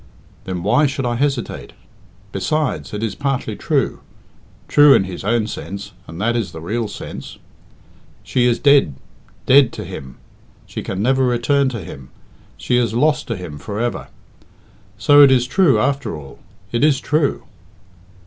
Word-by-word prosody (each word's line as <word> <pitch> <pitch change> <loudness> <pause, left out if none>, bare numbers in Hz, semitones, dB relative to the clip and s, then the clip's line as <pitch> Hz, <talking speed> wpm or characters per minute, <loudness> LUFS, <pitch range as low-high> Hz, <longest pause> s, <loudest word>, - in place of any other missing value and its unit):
Then 90 -2 -4
why 145 +10 +3
should 135 -1 -3
I 120 - 0
hesitate? 135 -1 -2 0.6
Besides, 140 +10 -2
it 105 +1 -4
is 110 - -1
partly 135 -2 -2
true - - -1 0.7
true 145 -1 +7
in 95 - +2
its 95 -2 -7
own 115 +2 +1
sense, 100 -1 -7 0.2
and 80 +1 -9
that 115 +4 0
is 110 -7 -2
the 80 - -7
real 110 +7 -2
sense. - - -8 0.9
She 125 -1 +1
is 120 - +2
dead 140 - +4 0.5
dead 135 -1 +6
to - - -6
him. 65 -1 -9 0.5
She - - -6
can 95 +2 -4
never 130 +2 +2
return 130 +3 +2
to 115 -5 -5
him; 70 -5 -10 0.5
she 125 - 0
is 115 -2 0
lost 150 +5 +1
to 115 - -2
him 80 -5 -8
for 100 +8 -6
ever. 120 0 -2 0.9
So 145 +8 +6
it 140 - +8
is 125 -2 +3
true 140 - +3
after 140 -1 -1
all 70 -4 -12 0.3
it 120 +3 0
is 145 -3 +4
true." 150 0 0
120 Hz, 160 wpm, -19 LUFS, 100-140 Hz, 0.9 s, it